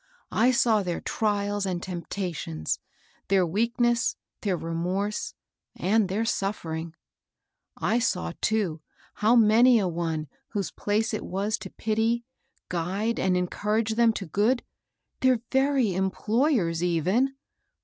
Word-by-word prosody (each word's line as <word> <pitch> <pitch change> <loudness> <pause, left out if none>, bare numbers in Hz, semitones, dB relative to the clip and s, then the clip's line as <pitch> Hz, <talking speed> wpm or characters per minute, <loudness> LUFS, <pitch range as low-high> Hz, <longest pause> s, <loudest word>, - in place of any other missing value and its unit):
I 235 +3 +4
saw 235 -4 +3
their 175 -3 -2
trials 205 -2 -1
and 180 -2 -1
tempta 180 +1 -4
tions, 80 - -3 0.5
their 190 -2 +3
weakness, 235 +5 +1 0.3
their 195 -4 0
remorse, 180 +6 -2 0.4
and 205 +1 +2
their 210 +4 0
suffering. 165 -6 -2 0.8
I 215 +9 +1
saw 85 - -1
too, 195 -8 0 0.3
how 220 +3 +3
many 235 +2 +6
a 200 -4 +1
one 165 -3 -2 0.3
whose 200 -3 -2
place 215 +2 0
it 215 - -2
was 200 +3 -1
to - - -7
pity, 225 +2 0 0.4
guide 190 +6 -1
and 185 -1 +2
encourage 210 +5 0
them 230 0 +4
to 200 - -4
good, 210 +9 +1 0.3
— - - -55
their 255 -3 +3
very 265 -6 +2
employers 190 - +1
even! 185 - +1
205 Hz, 130 wpm, -26 LUFS, 180-225 Hz, 0.8 s, many